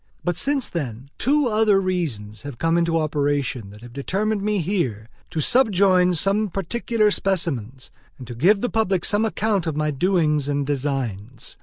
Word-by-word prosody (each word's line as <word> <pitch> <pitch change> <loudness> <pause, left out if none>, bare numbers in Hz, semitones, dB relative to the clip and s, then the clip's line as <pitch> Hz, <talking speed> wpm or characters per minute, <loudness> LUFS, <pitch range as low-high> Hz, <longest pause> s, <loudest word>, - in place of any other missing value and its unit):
But 175 -1 0
since 275 - +1
then, 135 -4 -5
two 290 +2 +2
other 215 -3 +3
reasons 140 - -3
have 140 -4 -8
come 165 +5 +1
into 170 -1 +2
operation 145 -7 -1
that 105 +2 -14
have 120 0 -12
determined 200 - -1
me 210 +1 0
here 150 - -2 0.2
to 160 - -2
subjoin 190 - +3
some 200 +5 +1
particular 215 +3 0
specimens, 140 - -2 0.3
and 125 -2 -9
give 195 - +4
the 245 - 0
public 195 -6 +1
some 210 +2 +2
account 210 -5 0
of 155 -2 -2
my 150 0 0
doings 150 -2 +1
and 145 -1 -1
designs. 130 -5 -3
170 Hz, 160 wpm, -22 LUFS, 135-200 Hz, 0.3 s, give